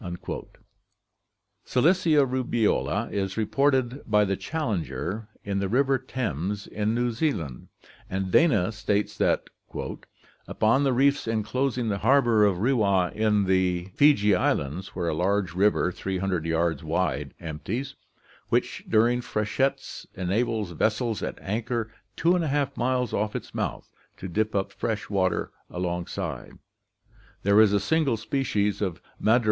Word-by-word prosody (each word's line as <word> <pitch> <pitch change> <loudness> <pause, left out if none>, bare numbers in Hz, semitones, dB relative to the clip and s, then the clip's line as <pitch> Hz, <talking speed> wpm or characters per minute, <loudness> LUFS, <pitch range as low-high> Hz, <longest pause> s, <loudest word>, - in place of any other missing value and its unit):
58 - - -6
ORGANIC 85 - -7
EVOLUTION - - -7 1.0
Cilicia 155 +1 +3
rubeola 125 -4 0
is 95 0 -2
reported 130 +3 +1
by 105 0 +4
the 100 0 0
'Challenger* 105 - -3 0.2
in 100 -1 -2
the 100 -1 -1
river 135 +3 +2
Thames 100 - -3
in 105 +2 -1
New 120 0 +1
Zealand; 110 - -2 0.4
and 95 0 -2
Dana 110 - +4
states 105 -1 -1
that - - +2 1.0
'upon 115 +6 +2
the 135 - +3
reefs 140 +1 +2
enclosing 115 +2 -1
the 100 -1 -1
harbor 120 -3 +4
of 100 -3 +2
Rewa 100 -5 +2 0.8
[Fiji 120 -8 +5
Islands], 90 +2 -1
where 90 -2 -2
a - - 0
large 95 +2 0
river, 95 -1 +2
300 95 -3 -2
yards 80 +1 0
wide, 75 -4 -1
empties, 95 - -4 0.6
which - - 0
during 120 +3 +3
freshets 110 +5 -2
enables 105 +2 -1
vessels 110 +5 0
at - - -4
anchor 110 +2 -2 0.3
2% 155 -5 +1
miles 125 -1 0
off 105 +1 -1
its - - -6
mouth - - -3 0.3
to 95 - -6
dip 105 +4 -1
up 95 -1 0
fresh 110 -2 -3
water 95 -2 0 0.2
alongside, 90 -1 -4 0.9
there 100 +2 +6
is 110 -2 +5
a 100 - +3
single 140 +2 +1
species 105 -4 -1
of 95 -5 -2 0.2
Madrepora 110 +2 +5
(M. - - +5
105 Hz, 130 wpm, -26 LUFS, 95-125 Hz, 1.0 s, there